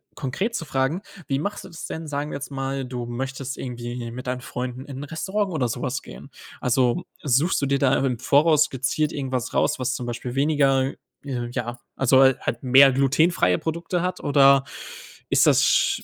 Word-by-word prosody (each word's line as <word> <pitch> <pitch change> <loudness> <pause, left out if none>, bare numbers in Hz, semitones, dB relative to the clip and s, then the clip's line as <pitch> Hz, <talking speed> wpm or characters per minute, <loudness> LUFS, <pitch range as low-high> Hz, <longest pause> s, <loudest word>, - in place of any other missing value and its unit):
konkret 190 - -3
zu 165 - -3
fragen: 135 +5 -1 0.3
Wie 135 0 0
machst 205 +7 -4
du - - -10
das 165 - -8
denn? 160 0 -6
Sagen 145 0 -3
wir - - -3
jetzt 140 - -7
mal, 135 0 -3
du 125 -1 -5
möchtest 130 +2 -5
irgendwie 120 -1 -5
mit 125 +2 -8
deinen 125 0 -2
Freunden 125 +1 -5
in 140 -3 -8
'n - - -5
Restaurant 190 +6 -2
oder 130 -6 0
so 120 +2 -4
was 130 -1 -2
gehen? - - -12 0.3
Also, 125 +5 +1 0.2
suchst 145 +5 +2
du - - +1
dir 140 0 +1
da 135 -1 +3
im 125 -3 0
Voraus 150 +3 +4
gezielt 140 +3 -1
irgendwas 130 -3 -3
raus, - - +2
was 130 0 -1
zum 125 - -5
Beispiel 120 +1 -5
weniger 135 -2 +2 0.3
ja, 120 -2 -4 0.2
also 135 0 +4
hal 135 -1 +5
halt 120 - -3
mehr 135 +1 +7
glutenfreie 135 - +2
Produkte 170 +2 -3
hat, 180 0 -2
oder 140 -1 +5 0.7
ist - - +4
das - - +5
sch - - +2
135 Hz, 190 wpm, -24 LUFS, 125-145 Hz, 0.7 s, mehr